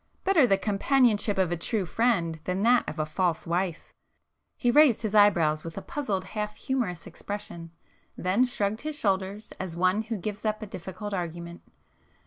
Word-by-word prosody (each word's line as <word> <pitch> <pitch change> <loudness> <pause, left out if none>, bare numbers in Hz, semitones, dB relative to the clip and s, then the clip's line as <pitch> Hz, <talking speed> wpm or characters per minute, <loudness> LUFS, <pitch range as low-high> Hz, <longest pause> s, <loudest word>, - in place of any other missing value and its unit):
Better 335 -9 +4
the 195 - +3
companionship 210 0 +2
of 185 -3 +1
a - - +1
true 195 +4 -1
friend 170 -5 0
than 185 +2 -1
that 240 +1 +4
of 155 - -7
a 155 - 0
false 165 +1 -1
wife!" 175 0 -2 0.6
He 245 - +2
raised 275 -5 +5
his 215 -2 -2
eyebrows 170 -8 +4
with 165 +1 -8
a - - -3
puzzled 210 -11 -2
half 210 +2 -4
humorous 230 -11 -2
expression—then 185 +3 -4
shrugged 220 -4 -2
his 305 0 -4
shoulders, 195 -1 -1
as 185 -3 -4
one 185 +4 +2
who 225 0 -4
gives 205 +2 -5
up 215 0 -1
a - - -4
difficult 195 +2 -7
argument. 170 -1 -5
200 Hz, 165 wpm, -27 LUFS, 175-220 Hz, 0.6 s, raised